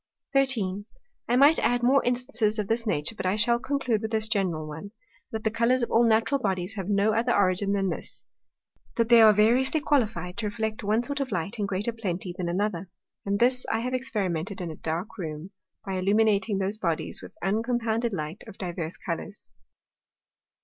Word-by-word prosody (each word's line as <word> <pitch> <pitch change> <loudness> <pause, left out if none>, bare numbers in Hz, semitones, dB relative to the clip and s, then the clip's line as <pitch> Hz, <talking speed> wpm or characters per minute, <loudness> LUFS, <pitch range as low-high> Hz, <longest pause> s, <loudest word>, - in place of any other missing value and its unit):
13. 220 -8 +1 0.4
I 240 - +3
might 285 +5 +6
add 245 0 +1
more 270 +3 +4
Instances 240 -3 0
of 210 -2 -2
this 230 +1 -1
Nature; 150 -1 0
but 195 - -3
I 185 - +1
shall 235 +3 +3
conclude 255 -5 -1
with 220 - -3
this 220 -1 0
general 185 -8 -1
one, 160 +7 -8 0.4
that 220 -1 -5
the 220 - +1
Colours 235 +2 +2
of - - -2
all 230 - +5
natural 225 +5 +2
Bodies 190 -3 -2
have 195 -2 -5
no 205 +1 +2
other 235 +2 +1
Origin 200 -1 +2
than 195 -1 0
this, - - -7 0.7
that 230 -1 +1
they 235 -1 +8
are 220 -1 +9
variously 240 +8 +3
qualified 215 - 0
to 220 - -2
reflect 220 +1 -3
one 215 +3 +1
sort 285 +3 -4
of 270 -3 -3
Light 195 +5 -3
in 205 - 0
greater 200 +4 -1
plenty 185 -5 -4
than 175 -2 -3
another. 190 0 -2 0.4
And 200 0 +1
this 250 +3 +2
I 225 - 0
have 250 +2 -3
experimented 200 -8 -2
in 175 -3 -4
a - - -8
dark 165 +7 -4
Room, 160 +1 -6 0.3
by 190 -1 -3
illuminating 205 +2 +2
those 195 +2 -1
Bodies 170 -6 -2
with - - -11
uncompounded 230 +3 0
Light 160 0 -5
of - - -11
divers 175 -3 -4
Colours. 185 +4 -6
215 Hz, 190 wpm, -26 LUFS, 190-235 Hz, 0.7 s, are